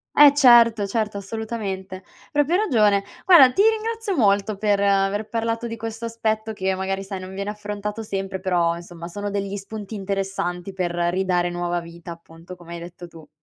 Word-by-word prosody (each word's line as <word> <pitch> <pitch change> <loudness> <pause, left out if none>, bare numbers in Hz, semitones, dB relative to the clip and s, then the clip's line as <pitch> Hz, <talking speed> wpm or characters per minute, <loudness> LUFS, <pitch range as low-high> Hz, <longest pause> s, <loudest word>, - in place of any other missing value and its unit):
Eh 290 -1 +9
certo 235 -6 +6
certo, 210 0 -2
assolutamente. 195 -3 -5 0.3
Proprio 295 +4 +2
ragione. 210 - +3 0.2
Guarda, 290 -9 +8
ti 395 - +2
ringrazio 445 -2 -1
molto 205 -3 +2
per 205 -1 +1
aver 200 +1 +1
parlato 230 0 -2
di 230 0 -4
questo 225 +1 -6
aspetto 220 -1 -2
che 190 -1 -1
magari 195 +1 -3
sai 195 -1 -6
non 185 +1 -9
viene 200 +1 -4
affrontato 210 +1 -5
sempre, 195 -2 -4
però 175 -3 +1
insomma 170 0 -9
sono 205 +3 -5
degli 200 0 -3
spunti 210 +1 -8
interessanti 195 -2 -3
per 180 -2 -2
ridare 175 +1 0
nuova 175 0 -2
vita 170 +1 -10
appunto 170 +1 -12
come 170 -1 -12
hai - - -7
detto 175 0 -10
tu. 160 -3 -15
200 Hz, 170 wpm, -23 LUFS, 185-220 Hz, 0.3 s, Eh